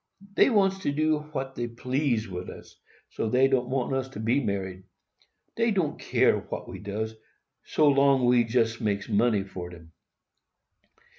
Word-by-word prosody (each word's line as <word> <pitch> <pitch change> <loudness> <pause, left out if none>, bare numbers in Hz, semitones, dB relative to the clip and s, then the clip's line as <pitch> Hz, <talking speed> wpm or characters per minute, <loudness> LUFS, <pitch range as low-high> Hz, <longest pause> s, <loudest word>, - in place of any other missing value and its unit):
Dey - - +5
wants 195 -4 +2
to 145 - -1
do 155 +1 +1
what 135 -3 -4
dey 120 -2 -3
please 125 -1 -1
wid 90 -1 -6
us, - - -12 0.4
so 110 - -2
dey 130 +3 +4
don't 130 -2 0
want 130 0 -1
us 130 0 -1
to 130 - -9
be 120 +6 +1
married. 95 -3 -3 0.7
Dey 230 0 +2
don't 185 -8 0
care - - +2
what - - -7
we - - -8
does, 105 +2 -4 0.5
so 140 -2 +4
we 120 -1 +5
jest 115 0 0
makes 100 -2 -1
money 105 -1 +2
for 90 -2 -7
dem. 85 -2 -14
120 Hz, 160 wpm, -27 LUFS, 105-140 Hz, 0.7 s, Dey